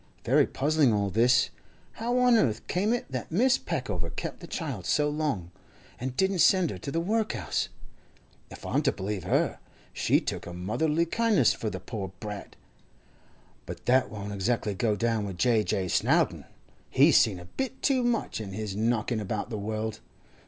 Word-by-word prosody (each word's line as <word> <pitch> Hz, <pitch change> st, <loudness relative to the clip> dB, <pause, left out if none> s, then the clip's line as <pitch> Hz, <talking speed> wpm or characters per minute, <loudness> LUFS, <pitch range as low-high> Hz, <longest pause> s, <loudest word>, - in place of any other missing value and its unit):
Very -, -, +4 dB
puzzling 145 Hz, -2 st, +2 dB
all 100 Hz, -2 st, 0 dB
this. 120 Hz, +5 st, +3 dB, 0.4 s
How 240 Hz, +2 st, -2 dB
on 250 Hz, -1 st, +5 dB
earth 115 Hz, -, +1 dB
came 200 Hz, +5 st, 0 dB
it 240 Hz, -, 0 dB
that 130 Hz, -2 st, -4 dB
Mrs. 245 Hz, +10 st, +2 dB
Peckover 105 Hz, -, -2 dB
kept -, -, -5 dB
the -, -, -10 dB
child -, -, -4 dB
so 150 Hz, -1 st, +2 dB
long, 145 Hz, -, -2 dB, 0.5 s
and 130 Hz, 0 st, -4 dB
didn't 190 Hz, -1 st, +2 dB
send 185 Hz, -3 st, +4 dB
her 95 Hz, -, -7 dB
to 140 Hz, -, -6 dB
the 165 Hz, -, -1 dB
workhouse? 215 Hz, +5 st, -1 dB, 0.8 s
If -, -, -11 dB
I'm -, -, +1 dB
to -, -, +2 dB
believe 100 Hz, 0 st, -4 dB
her, -, -, +1 dB, 0.3 s
she -, -, +2 dB
took -, -, -5 dB
a 85 Hz, -, -7 dB
motherly 135 Hz, -, 0 dB
kindness 215 Hz, -, +3 dB
for 110 Hz, -, -3 dB
the 95 Hz, -, -5 dB
poor 95 Hz, -1 st, -6 dB
brat. 105 Hz, -2 st, -7 dB, 1.1 s
But -, -, -8 dB
that 130 Hz, +1 st, +3 dB
won't 100 Hz, -1 st, -6 dB
exactly 105 Hz, +1 st, 0 dB
go 105 Hz, +2 st, 0 dB
down 115 Hz, 0 st, 0 dB
with 95 Hz, -3 st, -5 dB
J. 110 Hz, +2 st, +3 dB
J. 95 Hz, -3 st, -1 dB
Snowdon; -, -, +1 dB, 0.4 s
he's -, -, +5 dB
seen 95 Hz, -5 st, +3 dB
a 90 Hz, -, -10 dB
bit 265 Hz, -, -5 dB
too 270 Hz, -3 st, +3 dB
much 235 Hz, -, -1 dB
in 100 Hz, -3 st, -7 dB
his 105 Hz, -1 st, -4 dB
knocking 115 Hz, +1 st, 0 dB
about 105 Hz, +2 st, -3 dB
the 110 Hz, -, -3 dB
world. 110 Hz, +1 st, -3 dB
115 Hz, 175 wpm, -28 LUFS, 105-165 Hz, 1.1 s, on